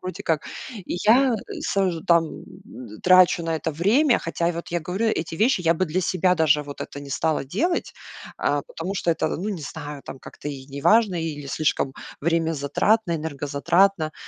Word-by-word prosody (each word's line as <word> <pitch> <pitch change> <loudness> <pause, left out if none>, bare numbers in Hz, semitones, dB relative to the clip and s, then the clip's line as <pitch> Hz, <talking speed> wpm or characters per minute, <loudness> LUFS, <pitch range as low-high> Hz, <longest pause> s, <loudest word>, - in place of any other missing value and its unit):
вроде 185 +2 -6
как. 160 -5 0 0.4
И - - -3
я 245 +3 +5 0.3
сажу 190 - 0
там 170 -2 +2 0.6
трачу 185 -1 +6
на 165 -1 -1
это 155 +1 -3
время. 235 - +3
Хотя 170 +1 -1
вот 170 0 -6
я 175 - -1
говорю 185 +8 -2
эти 165 -6 -1
вещи, 220 +3 +2
я 165 -1 +3
бы 185 +3 0
для 170 +4 -1
себя 180 0 +2
даже 150 -2 +3
вот 145 -1 -10
это 140 - -6
не 140 -1 -10
стала 155 +1 0
делать, 315 - -1 0.5
а, 145 -1 0
потому 180 +4 -5
что 175 - 0
это, 165 - 0
ну, 195 +5 -4
не 195 -6 -4
знаю, 145 0 -7
там - - -8
как-то - - -8
и 135 -2 -7
неважно 180 +7 +3
или 150 -3 -5
слишком 140 -2 0 0.3
времязатратно, 165 +5 +1
энергозатратно. 155 +3 +1
165 Hz, 170 wpm, -24 LUFS, 150-190 Hz, 0.6 s, трачу